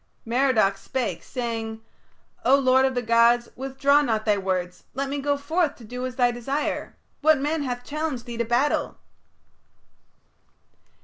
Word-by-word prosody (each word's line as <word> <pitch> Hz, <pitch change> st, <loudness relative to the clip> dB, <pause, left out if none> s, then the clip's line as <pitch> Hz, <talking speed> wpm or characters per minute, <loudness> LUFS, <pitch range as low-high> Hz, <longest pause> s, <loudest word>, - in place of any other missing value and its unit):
Merodach 230 Hz, -5 st, +2 dB
spake, 260 Hz, -3 st, -3 dB
saying: 225 Hz, -3 st, -4 dB, 0.6 s
"O 265 Hz, -, +6 dB
lord 260 Hz, -1 st, +4 dB
of 265 Hz, -1 st, 0 dB
the 245 Hz, -, -1 dB
gods, 235 Hz, +1 st, +4 dB
withdraw 270 Hz, +2 st, +2 dB
not 225 Hz, -6 st, -1 dB
thy 210 Hz, -2 st, +3 dB
words; 185 Hz, -2 st, -3 dB
let 275 Hz, +1 st, -2 dB
me 285 Hz, +1 st, -2 dB
go 285 Hz, +1 st, 0 dB
forth 315 Hz, +2 st, 0 dB
to 240 Hz, -, -15 dB
do 250 Hz, +3 st, -5 dB
as 255 Hz, -, -7 dB
is -, -, -23 dB
thy 245 Hz, -1 st, +4 dB
desire. 270 Hz, +5 st, -3 dB, 0.3 s
What 315 Hz, +1 st, +5 dB
man 300 Hz, +3 st, -1 dB
hath 245 Hz, -3 st, -3 dB
challenged 295 Hz, -4 st, -3 dB
thee 240 Hz, -2 st, -7 dB
to 235 Hz, -, 0 dB
battle?" 245 Hz, +6 st, 0 dB
250 Hz, 160 wpm, -25 LUFS, 230-280 Hz, 0.6 s, O